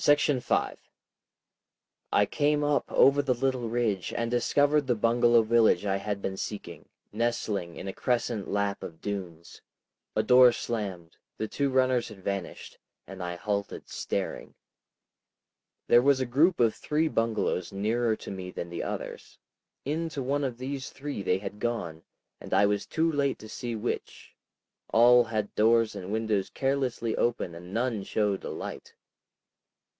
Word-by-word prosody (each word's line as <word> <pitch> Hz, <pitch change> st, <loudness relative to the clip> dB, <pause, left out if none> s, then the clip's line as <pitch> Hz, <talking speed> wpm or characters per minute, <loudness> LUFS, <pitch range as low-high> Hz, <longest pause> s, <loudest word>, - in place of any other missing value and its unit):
§ 145 Hz, -2 st, +3 dB
5 -, -, 0 dB, 1.3 s
I 105 Hz, -, +4 dB
came 150 Hz, +4 st, +1 dB
up 145 Hz, -1 st, +1 dB
over 140 Hz, +1 st, +5 dB
the 135 Hz, -3 st, 0 dB
little 130 Hz, -2 st, -1 dB
ridge 110 Hz, -6 st, -1 dB
and 115 Hz, 0 st, -2 dB
discovered 145 Hz, +4 st, +2 dB
the 125 Hz, -, +2 dB
bungalow 115 Hz, +1 st, +4 dB
village 115 Hz, -1 st, +3 dB
I 95 Hz, -1 st, +1 dB
had 100 Hz, 0 st, -4 dB
been 95 Hz, 0 st, -3 dB
seeking, 85 Hz, -7 st, -7 dB, 0.2 s
nestling 105 Hz, -6 st, -1 dB
in -, -, -7 dB
a 95 Hz, -, -4 dB
crescent 120 Hz, -4 st, -1 dB
lap 100 Hz, -1 st, -1 dB
of 80 Hz, -1 st, -8 dB
dunes. 90 Hz, -5 st, -6 dB, 0.5 s
A 110 Hz, -, +2 dB
door 125 Hz, +1 st, +7 dB
slammed, 95 Hz, -9 st, -5 dB, 0.2 s
the 110 Hz, -, -2 dB
two 140 Hz, +5 st, -1 dB
runners 130 Hz, -2 st, +2 dB
had 100 Hz, -4 st, -12 dB
vanished, 100 Hz, -2 st, -5 dB, 0.3 s
and 95 Hz, 0 st, -9 dB
I 90 Hz, 0 st, -3 dB
halted 100 Hz, +2 st, -3 dB
staring. -, -, -4 dB, 1.3 s
There 120 Hz, -, +6 dB
was 140 Hz, +1 st, +4 dB
a 130 Hz, -, 0 dB
group 155 Hz, +9 st, +3 dB
of 115 Hz, -2 st, +4 dB
three 155 Hz, +2 st, 0 dB
bungalows 110 Hz, -, -1 dB
nearer 110 Hz, +3 st, 0 dB
to -, -, -9 dB
me 95 Hz, -2 st, -6 dB
than 85 Hz, -1 st, -6 dB
the 85 Hz, -, -4 dB
others. -, -, -6 dB, 0.5 s
Into 155 Hz, -1 st, -2 dB
one 140 Hz, +3 st, 0 dB
of 125 Hz, -4 st, -2 dB
these 135 Hz, +1 st, -5 dB
three 140 Hz, -5 st, -6 dB
they 90 Hz, -1 st, +1 dB
had 105 Hz, +1 st, -7 dB
gone, 85 Hz, -10 st, -3 dB, 0.4 s
and -, -, -3 dB
I 100 Hz, -, +5 dB
was 100 Hz, 0 st, 0 dB
too 165 Hz, 0 st, +1 dB
late 140 Hz, -2 st, 0 dB
to 110 Hz, -, -11 dB
see 120 Hz, +1 st, -5 dB
which. 110 Hz, +2 st, -5 dB, 0.6 s
All 120 Hz, +1 st, +6 dB
had 110 Hz, -2 st, -3 dB
doors 115 Hz, 0 st, +3 dB
and 95 Hz, -1 st, -6 dB
windows 110 Hz, -3 st, 0 dB
carelessly 135 Hz, -4 st, -1 dB
open, 120 Hz, -7 st, 0 dB
and 90 Hz, +2 st, -10 dB
none 115 Hz, 0 st, -1 dB
showed 100 Hz, -1 st, -1 dB
a -, -, -5 dB
light. -, -, -7 dB
115 Hz, 155 wpm, -28 LUFS, 100-130 Hz, 1.3 s, door